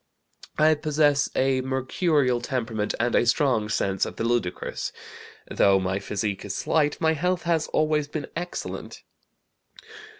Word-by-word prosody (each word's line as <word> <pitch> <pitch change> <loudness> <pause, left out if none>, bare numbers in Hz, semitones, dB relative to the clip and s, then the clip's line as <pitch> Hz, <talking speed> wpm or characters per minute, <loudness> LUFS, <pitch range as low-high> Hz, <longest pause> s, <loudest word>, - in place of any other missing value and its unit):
"I 155 +1 +5
possess 150 -2 +2
a 130 0 +2
mercurial 130 0 +1
temperament 115 -4 -2
and 120 +1 +1
a - - +4
strong 120 -4 +2
sense 95 -3 0
of - - -3
the - - -3
ludicrous. 115 -6 -2 0.6
Though 100 -1 +3
my 95 +1 -1
physique 100 0 -3
is 100 -1 -5
slight, 150 -2 +1
my 160 0 +2
health 180 +3 -1
has 165 -2 +1
always 155 -1 +1
been 150 -1 -4
excellent. 175 +2 -6
130 Hz, 135 wpm, -25 LUFS, 110-155 Hz, 0.6 s, I